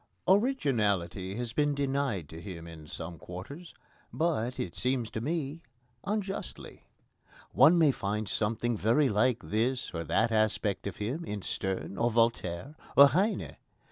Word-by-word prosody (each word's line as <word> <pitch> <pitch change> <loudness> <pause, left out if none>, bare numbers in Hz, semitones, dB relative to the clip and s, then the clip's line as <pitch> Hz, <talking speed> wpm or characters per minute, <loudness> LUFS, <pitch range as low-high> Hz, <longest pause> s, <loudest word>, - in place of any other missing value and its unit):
Originality 105 - +1
has 120 0 -4
been 145 -1 +2
denied 135 - -1
to 80 +3 -10
him 85 -4 -8
in 80 -2 -11
some 80 +1 -7
quarters, 115 - -9 0.4
but, 130 -7 -1
it 85 - -3
seems 125 -3 -1
to 110 - -3
me, 155 +2 -2 0.4
unjustly. 200 -1 -4 0.6
One 175 - +6
may 160 -4 +5
find 105 -2 -3
something 115 +4 0
very 120 +7 +3
like 115 +3 +2
this 120 +4 -1
or 85 -1 -3
that 110 +9 +2
aspect 110 -2 +1
of 100 - -5
him 125 +11 -3
in 105 - -5
Sterne, 95 0 -3
or 120 - +3
Voltaire, 115 - 0 0.2
or 140 0 +10
Heine. 195 +8 0
115 Hz, 140 wpm, -30 LUFS, 100-140 Hz, 0.6 s, or